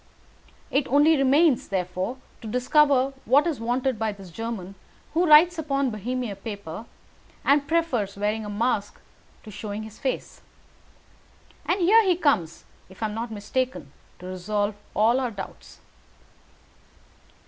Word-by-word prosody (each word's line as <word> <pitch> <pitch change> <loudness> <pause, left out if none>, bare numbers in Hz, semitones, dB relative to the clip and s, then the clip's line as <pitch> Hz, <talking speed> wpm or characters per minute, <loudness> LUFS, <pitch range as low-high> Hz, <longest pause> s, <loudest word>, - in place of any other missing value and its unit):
It 275 0 +1
only 295 +4 +5
remains, 275 +1 +3
therefore, 185 +5 -2 0.2
to 225 - -8
discover 265 +3 +3
what 275 +6 +4
is 325 -7 -1
wanted 245 +1 -1
by 220 -1 0
this 195 -3 -12
German 220 -2 -5 0.4
who 345 +2 +2
writes 325 +3 +7
upon 275 -4 0
Bohemian 225 0 -4
paper, 200 -1 -7 0.6
and 285 0 +3
prefers 255 -13 0
wearing 210 +2 -1
a 210 - -6
mask 205 -1 -1 0.4
to 215 - -10
showing 210 +1 -6
his 220 0 -11
face. 265 - -4 1.3
And 370 - +1
here 435 +6 +6
he 370 -3 +3
comes, 205 - 0 0.2
if 190 +4 -9
I 220 - 0
am - - -6
not 230 +2 -4
mistaken, 220 - -3 0.3
to 180 - -12
resolve 205 +3 -2 0.2
all 230 +5 +3
our 255 -2 -1
doubts." 200 -4 -10
235 Hz, 135 wpm, -25 LUFS, 205-280 Hz, 1.3 s, writes